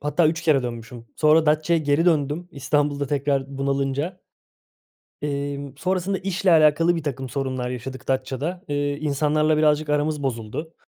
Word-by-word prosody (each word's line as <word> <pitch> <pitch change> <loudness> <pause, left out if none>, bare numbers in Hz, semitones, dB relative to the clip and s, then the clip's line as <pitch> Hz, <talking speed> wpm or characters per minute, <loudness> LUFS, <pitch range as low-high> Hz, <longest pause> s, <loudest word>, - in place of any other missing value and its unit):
Hatta 150 +3 +2
3 160 +1 -2
kere 145 -5 +3
dönmüşüm. 115 0 -7
Sonra 155 +1 +4
Datça'ya 155 +2 +3
geri 145 +3 +2
döndüm 160 +1 +1
İstanbul'da 145 0 0
tekrar 140 -1 -1
bunalınca 140 +5 -1 1.0
emm, 140 -1 -3
sonrasında 185 +4 -1
işle 190 0 0
alakalı 165 +1 +5
birtakım 135 -4 -4
sorunlar 130 -2 -3
yaşadık 130 +1 -7
Datça'da. 135 +7 -2
Eee, 145 0 -1
insanlarla 150 +1 +1
birazcık 150 0 +2
aramız 150 0 0
bozuldu. 130 +5 -4
145 Hz, 130 wpm, -23 LUFS, 135-155 Hz, 1.0 s, alakalı